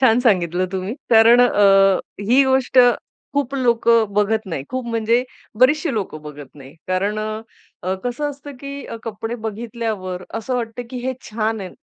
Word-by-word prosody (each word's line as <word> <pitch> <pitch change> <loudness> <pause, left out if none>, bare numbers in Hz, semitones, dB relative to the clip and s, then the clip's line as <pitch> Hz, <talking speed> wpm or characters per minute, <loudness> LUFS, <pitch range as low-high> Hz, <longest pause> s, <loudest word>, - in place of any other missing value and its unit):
छान 240 -3 +5
सांगितलं 185 -6 +2
तुम्ही 190 +2 -3 0.2
कारण 230 +1 +7
अ, 195 -5 +5 0.3
ही 255 +4 +6
गोष्ट 265 -1 +2 0.6
खूप 280 -1 -1
लोकं 230 -4 +2
बघत 210 +2 +2
नाही, 160 -7 -4
खूप 255 0 -3
म्हणजे 230 +2 +1 0.4
बरीचशी 300 +4 +4
लोकं 190 -7 -4
बघत 145 -3 -10
नाही 135 0 -13
कारण 195 +3 0
अ, 215 +1 -4 0.4
अ, 185 +1 -1
कसं 245 +4 -2
असतं 285 0 -11
की 280 0 -7
अ, - - -6
कपडे 225 +1 -5
बघितल्यावर 220 -4 -4
असं 225 +3 -3
वाटतं, 235 0 -3
की 255 - -5
हे 260 - 0 0.2
छान 220 0 -2
आहे, 190 - -6
225 Hz, 160 wpm, -20 LUFS, 195-250 Hz, 0.6 s, कारण